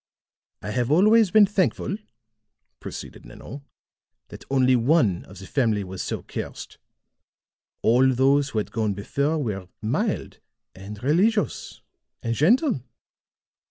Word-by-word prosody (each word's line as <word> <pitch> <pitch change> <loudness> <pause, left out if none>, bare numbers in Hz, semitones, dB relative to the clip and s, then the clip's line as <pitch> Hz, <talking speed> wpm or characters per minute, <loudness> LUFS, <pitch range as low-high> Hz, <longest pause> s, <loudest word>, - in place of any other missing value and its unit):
"I 105 - -4
have 120 +2 -1
always 210 +7 +5
been 215 +2 +6
thankful," 190 - -1 0.8
proceeded - - -9
Nanon, 115 - -10 0.7
"that - - -11
only 130 -1 +3
one 120 - +2
of 95 - -14
the 95 - -10
family 110 -4 0
was 95 0 -7
so - - -4
cursed. - - -7 1.0
All 130 +3 +4
those 135 +3 +2
who 115 - -5
had 105 - -2
gone 110 -3 -1
before 140 +10 -1
were 105 -10 -4
mild 110 +3 -2 0.3
and 100 +3 -10
religious 200 - 0 0.4
and 115 - -1
gentle. 235 - +3
130 Hz, 125 wpm, -24 LUFS, 105-160 Hz, 1.0 s, been